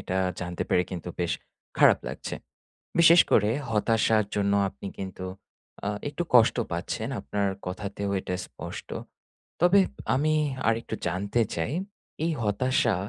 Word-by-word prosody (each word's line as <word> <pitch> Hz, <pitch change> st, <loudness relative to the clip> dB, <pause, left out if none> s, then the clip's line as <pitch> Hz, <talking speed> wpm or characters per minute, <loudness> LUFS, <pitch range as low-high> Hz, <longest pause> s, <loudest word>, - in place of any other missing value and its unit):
এটা 95 Hz, -, -3 dB, 0.2 s
জানতে 90 Hz, 0 st, -3 dB
পেরে 90 Hz, -, +3 dB
কিন্তু 90 Hz, -1 st, -5 dB
বেশ 85 Hz, -1 st, +1 dB, 0.5 s
খারাপ -, -, +7 dB
লাগছে। -, -, -5 dB, 0.6 s
বিশেষ 170 Hz, +1 st, +8 dB
করে 105 Hz, 0 st, +4 dB, 0.2 s
হতাশার 110 Hz, 0 st, +3 dB
জন্য 100 Hz, -1 st, +1 dB, 0.2 s
আপনি 100 Hz, -, -9 dB
কিন্তু 95 Hz, -1 st, -6 dB, 0.6 s
আ -, -, +1 dB, 0.2 s
একটু 175 Hz, -, -3 dB
কষ্ট 120 Hz, 0 st, +6 dB, 0.2 s
পাচ্ছেন 100 Hz, +6 st, -3 dB
আপনার 100 Hz, -1 st, -1 dB, 0.2 s
কথাতেও 100 Hz, +2 st, -4 dB
এটা 90 Hz, -, -4 dB
স্পষ্ট। -, -, -8 dB, 0.7 s
তবে 180 Hz, +3 st, +6 dB, 0.3 s
আমি 155 Hz, +3 st, +2 dB, 0.3 s
আরেকটু 115 Hz, 0 st, 0 dB
জানতে 100 Hz, +6 st, 0 dB
চাই 85 Hz, -, -2 dB, 0.5 s
এই 165 Hz, -, +1 dB
হতাশা, 120 Hz, +3 st, +2 dB
105 Hz, 130 wpm, -27 LUFS, 95-120 Hz, 0.7 s, বিশেষ